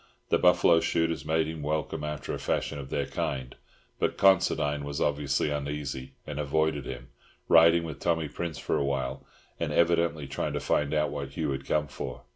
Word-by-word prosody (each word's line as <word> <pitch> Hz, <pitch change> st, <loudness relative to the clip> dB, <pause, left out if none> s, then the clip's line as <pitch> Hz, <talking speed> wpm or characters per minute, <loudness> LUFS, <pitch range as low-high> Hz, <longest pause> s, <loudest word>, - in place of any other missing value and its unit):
The -, -, +3 dB
buffalo 90 Hz, -1 st, +5 dB
shooters 80 Hz, 0 st, 0 dB
made 80 Hz, +1 st, +2 dB
him 80 Hz, -1 st, -5 dB
welcome 75 Hz, +1 st, -2 dB
after 75 Hz, -1 st, -4 dB
the -, -, -3 dB
fashion 70 Hz, -, -1 dB
of 65 Hz, -1 st, -7 dB
their 70 Hz, 0 st, -1 dB
kind; 65 Hz, -2 st, -3 dB, 0.4 s
but -, -, 0 dB
Considine 75 Hz, -6 st, +3 dB
was 70 Hz, +1 st, -4 dB
obviously 75 Hz, 0 st, +1 dB
uneasy, 70 Hz, -2 st, -4 dB
and 75 Hz, -1 st, -5 dB
avoided 75 Hz, -2 st, 0 dB
him, 65 Hz, -1 st, -7 dB, 0.4 s
riding 85 Hz, 0 st, +6 dB
with 80 Hz, -4 st, -6 dB
Tommy 80 Hz, -2 st, 0 dB
Prince 80 Hz, +2 st, -5 dB
for -, -, -1 dB
a -, -, +1 dB
while, 70 Hz, -2 st, -2 dB, 0.4 s
and -, -, -1 dB
evidently 85 Hz, -3 st, +2 dB
trying 70 Hz, 0 st, -3 dB
to -, -, -1 dB
find 75 Hz, -1 st, 0 dB
out 75 Hz, -1 st, +1 dB
what 70 Hz, -2 st, -5 dB
Hugh 75 Hz, -1 st, -1 dB
had 70 Hz, 0 st, -4 dB
come 75 Hz, -1 st, +1 dB
for. 65 Hz, -, -7 dB
75 Hz, 185 wpm, -28 LUFS, 70-80 Hz, 0.4 s, riding